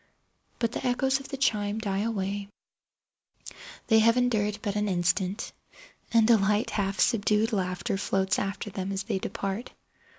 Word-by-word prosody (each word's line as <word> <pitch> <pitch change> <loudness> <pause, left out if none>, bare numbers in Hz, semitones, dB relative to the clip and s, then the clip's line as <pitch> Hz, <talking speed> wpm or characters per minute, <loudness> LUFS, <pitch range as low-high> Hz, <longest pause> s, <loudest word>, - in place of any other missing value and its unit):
But 230 -2 0
the - - -5
echoes 265 +2 +1
of 270 - -10
the 275 - -4
chime 210 -5 +1
die 200 -3 -2
away—they 200 -2 -2 1.5
have 230 +2 +4
endured 215 -4 +1
but 205 -1 -2
an 210 0 0
instant—and 195 - -1
a 230 - +7
light, 210 +4 +1
half 195 -2 -1
subdued 220 0 +2
laughter 190 +2 -1
floats 190 -1 +1
after 200 +1 -3
them 190 +1 -4
as 195 0 -2
they 190 - -2
depart. 195 +5 -4
205 Hz, 140 wpm, -27 LUFS, 195-230 Hz, 1.5 s, a